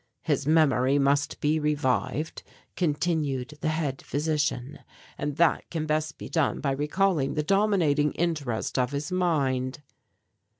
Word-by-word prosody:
"His 145 -2 0
memory 140 -4 +4
must 145 +2 +1
be 155 +1 +1
revived," 150 +1 -1 0.3
continued 150 -5 -1
the - - -1
head 155 -4 -2
physician, 150 -2 -2 0.4
"and 145 0 -3
that 170 -1 +2
can 160 -2 -3
best 155 -1 -1
be - - -7
done 160 -4 0
by 140 - 0
recalling 150 +1 +1
the 150 - 0
dominating 170 -6 +2
interest 145 -9 -1
of 125 +2 0
his 145 +3 -3
mind." 145 -7 0
150 Hz, 130 wpm, -27 LUFS, 140-160 Hz, 0.4 s, memory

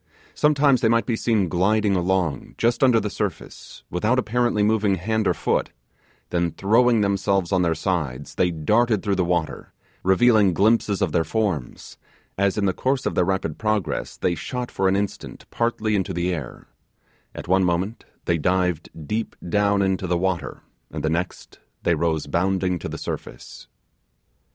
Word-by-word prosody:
Sometimes 145 -3 +3
they 110 - +3
might 115 0 +2
be 120 - 0
seen 110 -4 +1
gliding 100 +4 +2
along 90 -3 -1
just 120 +3 +1
under 125 -4 +5
the 105 - -3
surface, - - -6
without 105 +9 +1
apparently 120 -3 +1
moving 105 -2 +2
hand 110 +3 -1
or - - +3
foot - - 0 0.6
then 85 -1 +1
throwing 115 +3 +3
themselves 100 -2 0
on 95 -2 +2
their 85 -2 +1
sides, 75 -7 -3
they 90 - +1
darted 105 +7 +1
through 100 - 0
the 95 -1 +1
water, 85 -2 -2 0.3
revealing 100 -1 +4
glimpses 105 0 +2
of - - 0
their 85 - +2
forms, 85 - -3 0.4
as, 100 +1 +1
in 105 - +1
the 95 - +1
course 130 0 -1
of - - 0
their 90 - +2
rapid 95 -5 -2
progress, 105 -9 -2
they 90 - 0
shot 125 - -5
for 95 - 0
an 95 - +2
instant 100 0 -4
partly 110 -2 0
into 95 -1 -1
the 90 +1 0
air 70 -8 -7 0.7
at - - -8
one 95 +2 +3
moment 90 +5 -1 0.2
they 85 -1 +1
dived 90 0 0 0.2
deep 110 +6 -3
down 100 +2 +2
into 95 -1 -1
the 90 0 +1
water, 85 -6 -2 0.3
and - - -6
the 80 - 0
next 85 +2 -4 0.2
they 85 - +2
rose 80 -1 0
bounding 90 +3 0
to - - -6
the - - -6
surface. - - -8
95 Hz, 170 wpm, -23 LUFS, 85-110 Hz, 0.7 s, under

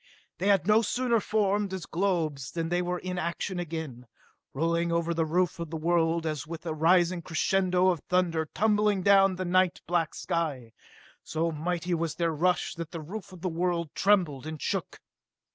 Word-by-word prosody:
They 190 - 0
had 200 -3 +4
no 215 +2 +5
sooner 235 +2 +1
formed 205 -1 0
as 185 - -6
globes 165 -8 -1
than 165 -1 -2
they 175 +1 +1
were 180 0 -2
in 180 0 -4
action 175 +2 -3
again, 155 -8 -6 0.4
rolling 170 +3 0
over 170 0 0
the 165 -1 0
roof 175 +2 0
of 170 -2 -4
the 160 - -4
world 165 0 +1
as 150 -2 -3
with 165 +1 -7
a 160 - -2
rising 175 +2 +3
crescendo 185 +3 +2
of 175 -3 0
thunder 170 -4 +1
tumbling 210 -2 +2
down 195 -1 +5
the 185 +1 -3
night 185 0 +2
black 170 -2 0
sky. 150 -10 -3 0.5
So 165 +1 -1
mighty 175 +3 -2
was 165 -2 -1
their 170 -2 0
rush 175 +2 +1
that 165 -2 -6
the 165 - -6
roof 185 +6 -8
of 185 -2 -12
the 185 - -1
world 170 -2 -1
trembled 175 -9 +2
and 155 -1 -6
shook. - - -3
170 Hz, 180 wpm, -28 LUFS, 160-185 Hz, 0.5 s, no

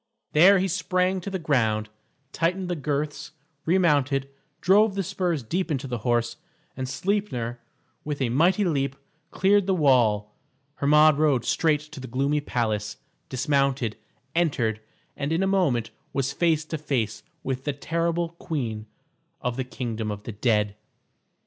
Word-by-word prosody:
There 185 +6 +7
he 190 +1 +1
sprang 185 +1 0
to 200 - -5
the 190 - -2
ground, 115 -10 +1 0.4
tightened 180 +3 -1
the 175 - 0
girths, 150 0 -3 0.3
remounted, 145 -6 +2 0.3
drove 200 +2 +4
the 195 - 0
spurs 180 -6 -1
deep 180 +11 -2
into 140 -3 -2
the 120 -2 -3
horse, 120 +1 0 0.4
and 130 0 -4
Sleipner, 140 - -2 0.4
with 150 -1 -4
a 130 -3 +1
mighty 175 - +3
leap, 140 -5 0 0.3
cleared 200 +2 +3
the 190 - +2
wall. 115 - +3 0.4
Hermod 150 +1 +5
rode 145 -6 +2
straight 155 -3 +2
to 150 -1 -11
the 130 - -7
gloomy 140 +4 0
palace, 110 -6 -2 0.3
dismounted, 135 -3 +1 0.4
entered, 125 -10 +1 0.3
and 140 +1 -3
in 165 +4 +1
a - - +2
moment 145 - +1 0.2
was 135 0 -1
face 160 -1 +1
to 160 0 -4
face 115 -8 -1 0.2
with 130 0 -3
the 145 - +1
terrible 170 +3 -1
queen 125 -11 -4 0.5
of 125 -2 -2
the 130 - -2
kingdom 115 -3 -4
of 105 0 -5
the 115 - -6
dead. 105 -2 +1
145 Hz, 150 wpm, -25 LUFS, 120-170 Hz, 0.5 s, There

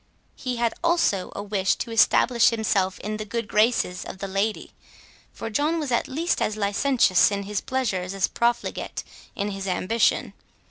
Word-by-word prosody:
He 255 -2 -4
had 235 -1 0
also 335 - +1
a 200 - -4
wish 200 -2 +1
to 235 - -5
establish 230 +1 +4
himself 200 -4 0
in 215 +1 -4
the 215 - -4
good 230 +1 -4
graces 210 -4 +1
of - - -8
the 195 - -5
lady; 195 +3 -2 0.6
for 225 - -7
John 305 +8 +1
was 295 -5 -3
at 235 - +1
least 325 +6 -1
as 215 - 0
licentious 205 -1 +3
in 200 -1 -3
his 205 0 -3
pleasures 195 -8 -2
as 195 - +1
profligate 235 0 -2 0.3
in 205 +1 -2
his 195 0 -5
ambition. 205 +5 +1
215 Hz, 170 wpm, -24 LUFS, 195-240 Hz, 0.6 s, establish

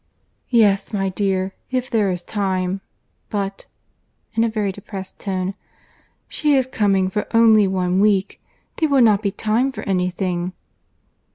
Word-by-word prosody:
"Yes, 205 -5 +3
my 195 -2 0
dear, 190 0 -1 0.2
if 255 -1 -1
there 215 -5 +1
is 180 -1 -3
time.—But—(in 195 +3 -5
a 230 - +2
very 210 -3 -1
depressed 195 0 -9
tone)—she 195 +9 -4
is 260 -2 +3
coming 200 -6 +1
for 210 +2 -2
only 220 -3 +6
one 185 -1 0
week. 200 -1 +2 0.4
There 315 - +1
will 275 -3 +5
not 210 -3 +4
be 205 - 0
time 225 +7 0
for - - -7
any 180 -2 0
thing." 180 0 -3
200 Hz, 130 wpm, -21 LUFS, 190-220 Hz, 0.4 s, only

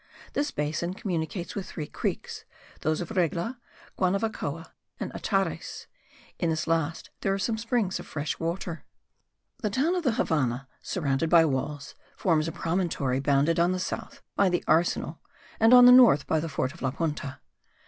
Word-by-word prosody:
This 290 +1 0
basin 155 - -2
communicates 175 -2 -3
with 200 -3 -5
three 155 - -5
creeks, - - -4 0.4
those 155 +1 0
of 175 - -6
Regla, 185 - -1 0.4
Guanavacoa 185 -5 -1 0.3
and - - -4
Atares; - - -2 0.5
in 170 - +1
this 160 -1 -1
last 165 -1 -1
there 195 -1 0
are - - -2
some 220 +3 -1
springs 225 -4 0
of - - -9
fresh 150 0 -3
water. 170 0 -3 0.8
The 210 - -1
town 275 - +1
of 365 - 0
the 255 -6 +2
Havannah, 135 - 0
surrounded 155 -2 -1
by 165 -1 +7
walls, 140 0 -3 0.2
forms 160 -4 +2
a - - -2
promontory 165 -7 -1
bounded 140 +4 +2
on 175 +2 +3
the 185 - -2
south - - -5
by 200 - +4
the 175 -1 0
arsenal 160 -1 +1 0.4
and 225 +1 +5
on 250 0 +10
the 245 - +10
north 245 - +7
by 160 - +1
the 165 +1 -3
fort 135 -1 -2
of 170 - -15
La 130 - +1
Punta. 145 -2 -3
165 Hz, 170 wpm, -27 LUFS, 150-195 Hz, 0.8 s, on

